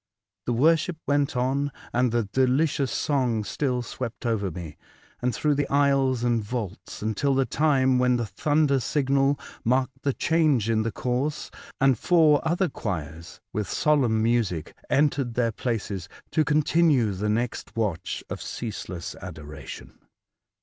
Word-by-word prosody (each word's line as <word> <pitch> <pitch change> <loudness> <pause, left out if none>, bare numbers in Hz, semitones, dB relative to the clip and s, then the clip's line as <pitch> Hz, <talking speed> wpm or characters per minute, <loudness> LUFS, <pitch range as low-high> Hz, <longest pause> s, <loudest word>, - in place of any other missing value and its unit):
The 120 - +1
worship 160 +6 +3
went 145 -2 +1
on, 135 +3 0 0.2
and 125 0 +2
the 120 0 +1
delicious 130 +4 +1
song 125 -7 0
still 125 +3 -1
swept 120 0 -6
over 110 -4 0
me, 80 -3 -8 0.5
and 125 +1 +1
through 150 +4 +1
the 145 0 -1
aisles 135 -3 +2
and 120 -2 +1
vaults, 105 -3 -5
until 120 +6 +1
the 135 0 +2
time 130 -4 +2
when 125 0 +3
the 120 -1 -1
thunder 145 +7 +1
signal 135 +1 +1 0.2
marked 130 +2 0
the 140 - 0
change 150 -10 +2
in 110 -1 +2
the 115 +1 -1
course, 130 +7 -2 0.3
and 135 -4 +3
four 160 -4 +4
other 175 +3 +1
choirs, 85 - -6
with 105 -1 -2
solemn 125 -8 +2
music, 110 -9 0 0.2
entered 140 -4 +1
their 115 -2 +1
places 105 -6 -3 0.2
to 155 - +3
continue 150 -5 +3
the 100 +2 -2
next 115 +3 -2
watch 95 -6 -2
of - - -6
ceaseless 95 -6 -5
adoration. 75 -5 -9
125 Hz, 145 wpm, -25 LUFS, 110-140 Hz, 0.5 s, four